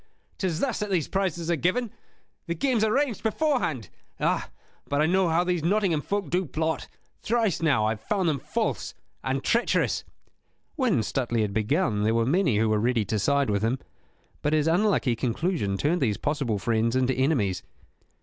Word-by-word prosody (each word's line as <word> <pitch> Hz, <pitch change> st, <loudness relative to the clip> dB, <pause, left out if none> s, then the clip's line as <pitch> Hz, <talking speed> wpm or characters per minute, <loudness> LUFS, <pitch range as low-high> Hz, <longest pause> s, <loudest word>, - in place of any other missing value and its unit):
'Tis 175 Hz, -4 st, -1 dB
thus 255 Hz, -4 st, 0 dB
that 210 Hz, -1 st, -2 dB
these 175 Hz, -6 st, 0 dB
prizes 175 Hz, -3 st, -1 dB
are -, -, +3 dB
given; 190 Hz, -, 0 dB, 0.6 s
the 170 Hz, -, -1 dB
game's 240 Hz, -, +1 dB
arranged 245 Hz, +1 st, +1 dB
beforehand. 220 Hz, -, 0 dB, 0.3 s
Ah, -, -, 0 dB, 0.4 s
but 145 Hz, -, 0 dB
I 155 Hz, -, +4 dB
know 185 Hz, +1 st, +2 dB
how 165 Hz, +2 st, +3 dB
these 180 Hz, -3 st, -1 dB
Nottingham 185 Hz, -4 st, +2 dB
folk 200 Hz, -2 st, -3 dB
do 180 Hz, 0 st, +1 dB
plot: 160 Hz, +3 st, -2 dB, 0.3 s
thrice 225 Hz, -6 st, 0 dB
now 140 Hz, -10 st, +3 dB
have 110 Hz, 0 st, -1 dB
I -, -, -28 dB
found 195 Hz, -4 st, 0 dB
them 150 Hz, -4 st, +1 dB
false -, -, -2 dB, 0.3 s
and 135 Hz, +1 st, -1 dB
treacherous." 235 Hz, +1 st, +1 dB, 0.7 s
When 235 Hz, -, +2 dB
Stuteley 120 Hz, -1 st, -1 dB
had 100 Hz, -2 st, -2 dB
begun 110 Hz, -, +1 dB
there 110 Hz, +2 st, +2 dB
were 115 Hz, 0 st, +2 dB
many 140 Hz, -, +2 dB
who 110 Hz, +1 st, +2 dB
were 110 Hz, -1 st, +2 dB
ready 115 Hz, -1 st, +1 dB
to 105 Hz, +2 st, -1 dB
side 140 Hz, +2 st, +2 dB
with 100 Hz, -1 st, 0 dB
him, 115 Hz, +4 st, +1 dB, 0.6 s
but 150 Hz, -, 0 dB
his 155 Hz, -1 st, +2 dB
unlucky 170 Hz, -, +2 dB
conclusion 120 Hz, -, -1 dB
turned 155 Hz, -, +1 dB
these 110 Hz, -6 st, +1 dB
possible 140 Hz, -7 st, -1 dB
friends 115 Hz, +3 st, 0 dB
into 130 Hz, 0 st, +2 dB
enemies. 125 Hz, -9 st, +1 dB
155 Hz, 180 wpm, -26 LUFS, 115-190 Hz, 0.7 s, I